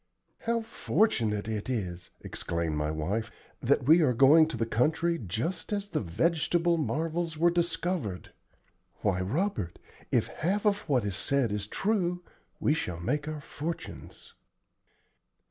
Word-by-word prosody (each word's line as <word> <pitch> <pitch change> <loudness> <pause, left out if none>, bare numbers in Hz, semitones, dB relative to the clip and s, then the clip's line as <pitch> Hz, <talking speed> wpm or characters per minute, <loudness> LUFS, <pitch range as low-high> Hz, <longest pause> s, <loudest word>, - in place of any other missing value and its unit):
"How 230 0 +2
fortunate 115 - +1
it 110 +1 -3
is," 90 -8 -3
exclaimed 85 -2 -2
my 75 0 -1
wife, 95 +9 -2 0.3
"that - - +2
we 160 +7 +6
are 135 -5 +4
going 145 +6 +7
to 160 - -5
the 115 - 0
country 160 +9 +1
just 120 - -3
as 205 -1 -2
the - - -1
vegetable 170 - +1
marvels 165 +2 -1
were 170 +2 +4
discovered! 170 - -2 0.7
Why, 95 -3 +1
Robert, 115 - -1 0.3
if - - +3
half 200 +6 -1
of 205 -1 +3
what 125 -6 +2
is 100 -2 -1
said 135 +1 +2
is 105 -1 -2
true, 180 - 0 0.4
we 150 - +3
shall 90 - -3
make 145 - -1
our 155 -1 -4
fortunes." 160 +4 -7
145 Hz, 140 wpm, -29 LUFS, 105-170 Hz, 0.7 s, going